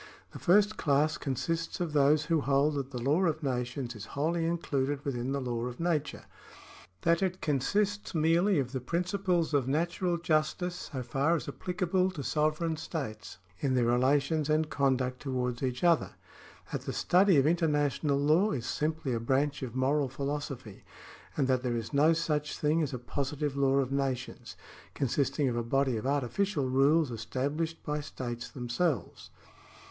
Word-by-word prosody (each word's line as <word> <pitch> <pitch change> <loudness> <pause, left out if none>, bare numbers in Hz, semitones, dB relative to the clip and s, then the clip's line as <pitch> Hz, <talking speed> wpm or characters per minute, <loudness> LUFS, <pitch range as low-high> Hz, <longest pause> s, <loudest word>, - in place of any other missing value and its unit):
The - - -9
first 205 +3 +4
class 150 +1 +2
consists 165 +6 -2
of 170 -4 -2
those 150 +1 +4
who 165 -2 +1
hold 140 +2 +2
that 140 -2 -3
the 125 -3 -5
law 145 +9 +2
of 155 -2 -1
nations 125 -1 -2
is 105 -1 -8
wholly 165 +3 +1
included 145 -4 -1
within 130 -2 -2
the 140 - 0
law 120 -2 -2
of 125 0 -7
nature 165 -3 -1 0.4
— 95 0 -20
that 170 +1 +3
it 185 -1 -1
consists 200 +9 0
merely 170 +5 +3
of 130 -3 -1
the 130 -2 -3
principles 180 - 0
of 140 -3 +2
natural 170 +4 0
justice 170 +2 -1
so 130 -3 -4
far 135 +7 +1
as 165 - -4
applicable 180 +5 0
to 165 -7 -6
sovereign 155 +3 0
states 135 - -6 0.2
in 135 -2 0
their 125 -2 +3
relations 140 +5 +2
and 155 0 +1
conduct 130 -2 +1
towards 125 -3 -2
each 125 +1 -2
other 170 -2 +3 0.3
— - - -21
that - - -2
the - - -5
study 185 -1 +4
of 135 - +4
international 150 -3 +1
law 155 +9 +3
is 120 -4 -3
simply 150 0 -1
a 115 - 0
branch 140 +5 0
of 125 -2 -5
moral 135 +1 +1
philosophy 135 -5 -5 0.3
— - - -20
and 140 -3 +2
that 130 -1 +2
there 125 -2 -1
is 115 +4 -5
no 150 +3 +5
such 150 -3 -1
thing 155 +2 +2
as 150 - -1
a 130 - -3
positive 140 +3 -3
law 135 -1 +2
of 135 -1 +1
nations, 135 -2 -3 0.4
consisting 140 +1 0
of 120 - -1
a 120 - 0
body 130 +2 +1
of 110 +4 -3
artificial 140 - 0
rules 140 +3 +3
estabhshed 140 +8 -2
by 150 0 -1
states 120 -4 -6
themselves. 130 +4 -2
145 Hz, 175 wpm, -30 LUFS, 130-165 Hz, 0.4 s, no